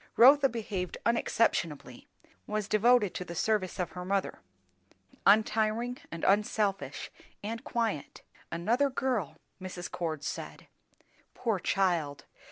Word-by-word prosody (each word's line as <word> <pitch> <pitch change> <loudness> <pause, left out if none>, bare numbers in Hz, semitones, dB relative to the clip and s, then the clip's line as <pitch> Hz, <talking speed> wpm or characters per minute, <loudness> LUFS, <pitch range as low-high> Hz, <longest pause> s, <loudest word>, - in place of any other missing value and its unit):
Rotha 275 +3 +8
behaved 205 -6 -4
unexceptionably; 170 - 0 0.4
was 210 -1 -2
devoted 215 -1 +4
to - - -4
the 170 -1 -8
service 205 0 0
of 180 - -2
her 180 - -6
mother; 195 +1 -1 0.9
untiring, 220 +3 +3
and 170 - -6
unselfish, 205 0 +1 0.3
and 225 +2 -4
quiet; 225 -11 -2 0.3
"another 230 +12 +1
girl," 255 - -1 0.2
Mrs. 180 -1 -6
Cord 160 -4 -3
said. - - -6 0.7
Poor 225 -6 0
child! 170 -7 0
205 Hz, 110 wpm, -30 LUFS, 180-230 Hz, 0.9 s, Rotha